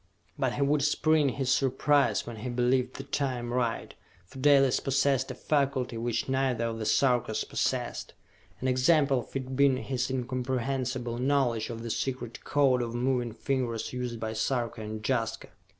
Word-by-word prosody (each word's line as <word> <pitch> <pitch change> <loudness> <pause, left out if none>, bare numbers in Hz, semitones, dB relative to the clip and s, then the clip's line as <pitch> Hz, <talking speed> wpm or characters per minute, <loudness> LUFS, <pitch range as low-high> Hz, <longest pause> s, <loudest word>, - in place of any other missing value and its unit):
But - - 0
he 140 - +1
would 145 +1 +2
spring 150 0 +3
his 130 0 -1
surprise 135 -3 +2
when 120 -1 -7
he 110 +4 -5
believed 125 +1 +1
the 135 - -6
time 130 -4 -2
right, 120 -2 -1 0.3
for 130 - -12
Dalis 135 -1 +5
possessed 135 -1 +1
a - - -5
faculty 140 -5 0
which 115 0 -2
neither 130 -3 0
of 115 -1 -3
the 110 - -2
Sarkas 120 -5 +2
possessed - - -2 0.5
an 130 - -1
example 135 +1 +3
of 120 - -11
it 130 -1 -3
being 140 -1 +4
his 130 -1 -2
incomprehensible 130 -1 -2
knowledge 125 -4 +1
of 115 -1 -6
the 115 - -3
secret 125 -2 -4
code 135 -3 +3
of 120 -1 -4
moving 125 -1 0
fingers 120 -2 -2
used 125 -2 -4
by 110 0 -3
Sarka 115 0 -1
and 110 0 -6
Jaska. 115 -4 -1
130 Hz, 165 wpm, -28 LUFS, 120-135 Hz, 0.5 s, Dalis